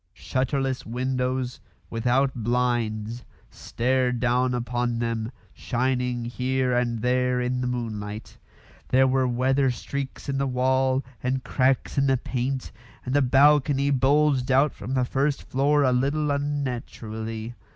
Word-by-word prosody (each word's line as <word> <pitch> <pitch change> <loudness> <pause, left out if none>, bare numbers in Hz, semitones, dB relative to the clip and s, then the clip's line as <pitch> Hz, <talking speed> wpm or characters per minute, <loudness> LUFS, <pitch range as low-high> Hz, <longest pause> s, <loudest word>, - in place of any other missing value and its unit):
Shutterless 130 +1 -1
windows, 125 +1 -2 0.3
without 125 +4 +1
blinds, 120 -1 -1 0.3
stared 125 0 0
down 125 +1 +1
upon 120 0 -1
them, 115 -1 -2 0.2
shining 125 -1 -1
here 125 +1 0
and 120 -2 0
there 125 0 +2
in 125 0 -1
the 125 - -1
moonlight. 110 -3 -5 0.5
There 130 +1 +4
were 130 0 +2
weather 130 +2 +2
streaks 135 +2 -5
in 135 -1 -1
the 140 - +1
wall 130 +1 +1 0.2
and 130 +1 -1
cracks 130 +2 +1
in 140 - +2
the 135 -1 +3
paint, 130 +2 -3 0.3
and 130 - -2
the 145 - +4
balcony 140 +1 +4
bulged 140 0 +3
out 135 +3 +4
from 125 +6 -5
the 130 -1 +2
first 135 +3 0
floor 145 +2 +2
a 130 - +3
little 140 +4 +1
unnaturally. 120 -5 -4
125 Hz, 130 wpm, -25 LUFS, 120-135 Hz, 0.5 s, There